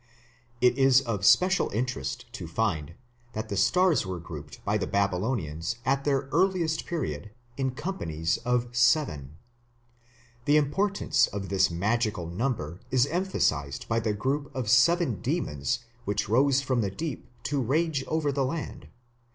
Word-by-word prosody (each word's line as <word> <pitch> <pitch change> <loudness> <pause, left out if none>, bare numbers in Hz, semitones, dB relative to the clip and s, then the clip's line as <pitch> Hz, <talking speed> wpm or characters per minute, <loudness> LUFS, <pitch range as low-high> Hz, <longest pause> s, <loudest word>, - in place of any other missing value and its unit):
It 125 +1 +4
is 135 0 +6
of 115 -7 -3
special 185 - +4
interest 105 - -3
to 85 - -6
find 85 -4 -1 0.4
that 110 +1 -4
the 100 - -2
stars 180 - +3
were 95 -3 -5
grouped 80 -3 -10
by - - +1
the - - -2
Babylonians 100 - -1
at 135 +2 +1
the 135 -2 +1
earliest 170 -2 +1
period 105 - -3 0.3
in 135 -1 0
companies 85 - -2
of 120 0 -1
seven. 120 - +2 1.1
The 145 +1 +5
importance 150 0 +2
of 100 -2 -5
this 95 -1 +3
magical 105 +2 0
number 85 - -3
is 130 -1 +3
emphasized 140 - -1
by 115 0 +1
the 110 -2 -1
group 140 +6 -1
of 120 -5 -1
seven 130 - +4
demons 75 - -2 0.2
which 105 0 -1
rose 135 +5 +3
from 130 -3 0
the 100 - 0
deep 145 +4 -5 0.2
to 140 +3 -1
rage 145 +3 0
over 155 -2 0
the 140 0 0
land 145 +4 -4
(p. - - -16
71). - - -17
120 Hz, 150 wpm, -27 LUFS, 95-145 Hz, 1.1 s, is